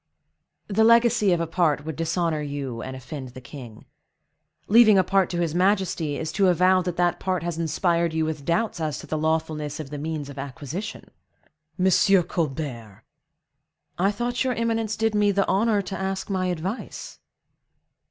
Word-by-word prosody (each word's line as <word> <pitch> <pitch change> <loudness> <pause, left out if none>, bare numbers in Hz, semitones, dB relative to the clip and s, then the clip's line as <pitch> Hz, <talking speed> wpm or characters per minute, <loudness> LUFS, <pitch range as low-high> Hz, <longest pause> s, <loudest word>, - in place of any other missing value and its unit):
"The 215 +2 +2
legacy 230 -2 +5
of 175 - +2
a 165 - 0
part 160 -3 0
would 160 -2 -4
dishonor 165 -1 -1
you 140 -5 -4
and 130 - -6
offend 130 -1 -8
the - - -7
king. 120 -4 -11 0.8
Leaving 215 -1 +7
a 190 - +5
part 195 -1 +2
to 175 - -2
his 165 -3 -1
majesty, 180 -5 +1
is 160 0 -3
to 195 +2 +2
avow 185 +1 +4
that 180 -1 -4
that 175 0 +1
part 185 -3 -1
has 170 -1 -3
inspired 170 +1 +1
you 160 0 0
with 155 -2 -4
doubts 200 +6 0
as 155 -4 -2
to - - -9
the - - -3
lawfulness 155 -1 -1
of 150 -2 -7
the 145 - -5
means 155 -1 -4
of 140 -1 -9
acquisition." 145 - -6 0.7
"Monsieur 190 0 +4
Colbert!" 135 - -4 1.0
"I 195 +2 +3
thought 240 +4 -1
your 260 -1 0
eminence 225 -1 -1
did 225 0 +1
me 205 -1 +3
the 195 0 +1
honor 205 +1 +2
to 190 +1 -5
ask 190 +1 -3
my 185 -1 0
advice?" 180 +6 -5
170 Hz, 170 wpm, -24 LUFS, 150-195 Hz, 1.0 s, Leaving